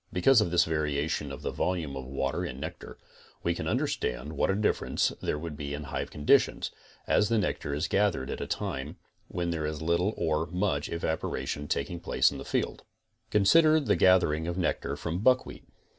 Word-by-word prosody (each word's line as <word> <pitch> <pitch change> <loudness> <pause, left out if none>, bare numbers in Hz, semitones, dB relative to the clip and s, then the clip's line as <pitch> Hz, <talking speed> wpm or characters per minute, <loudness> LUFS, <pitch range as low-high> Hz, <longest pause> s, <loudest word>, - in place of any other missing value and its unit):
Because 115 +7 +5
of 100 - 0
this 85 0 +4
varie 75 -2 0
tion 75 -3 -2
of 70 - -8
the - - -2
volume 85 -7 -2
of 65 -1 -6
water 65 +1 -2
in 65 - -5
nectar, 80 +4 -7 0.5
we 85 - +1
can - - -4
understand 60 +5 -1
what - - +1
a 95 - +2
differance 105 +1 +1
there - - -1
would 80 0 -6
be 70 -1 -4
in 75 - -6
hive 75 - -4
conditions, 75 - +2 0.3
as 105 - +3
the 115 - +2
nectar 90 -7 -1
is 75 - -1
gathered 95 -10 +1
at - - -4
a - - -3
time - - -4 0.3
when 85 -1 -2
there 80 -2 -2
is 75 -1 -4
little 85 +6 +1
or 80 +1 0
much 90 -5 -1
evaporation 75 -3 -3
tak 70 - -1
ing 85 - -5
place - - +2
in - - -7
the - - -6
field. - - -1 0.5
Consider 155 +10 +5
the 120 -9 +1
gathering 85 -4 +4
of 85 +1 -3
nectar 80 -5 -1
from 85 +3 -3
buckwheat. 130 +4 +1
80 Hz, 195 wpm, -29 LUFS, 75-95 Hz, 0.5 s, Because